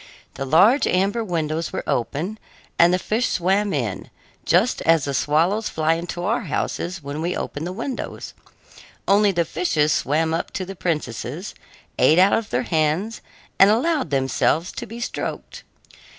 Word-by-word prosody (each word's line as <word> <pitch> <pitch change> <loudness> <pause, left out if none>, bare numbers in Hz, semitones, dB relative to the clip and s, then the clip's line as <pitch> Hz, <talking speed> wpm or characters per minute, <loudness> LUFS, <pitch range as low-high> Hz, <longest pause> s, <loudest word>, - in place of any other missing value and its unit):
The 135 - -5
large 195 - +5
amber 200 +5 +1
windows 165 -4 -2
were - - -4
open, 160 - -2 0.4
and 170 +1 +6
the 180 - +3
fish 220 +6 -1
swam 195 +3 +1
in, 120 - -3 0.4
just 195 +9 +2
as 165 -3 +3
the 140 - -2
swallows 170 +11 +1
fly 160 0 +1
into 175 +1 -4
our 225 +6 0
houses 170 +2 -3
when 140 +2 -5
we 175 +2 -1
open 145 +3 -4
the 180 - -4
windows; 235 +6 -5 0.7
only 200 +1 +4
the 170 -2 0
fishes 155 -3 +1
swam 160 +3 0
up 165 - -2
to 185 - -3
the 195 +1 -8
princesses, 155 - -3 0.5
ate 160 - +5
out 190 +2 +5
of 225 -2 0
their 125 +1 0
hands, 160 +8 0 0.4
and 195 - +8
allowed 265 - +1
themselves 140 +5 +1
to - - -7
be 230 +3 -8
stroked. 240 - -5
175 Hz, 160 wpm, -22 LUFS, 155-205 Hz, 0.7 s, and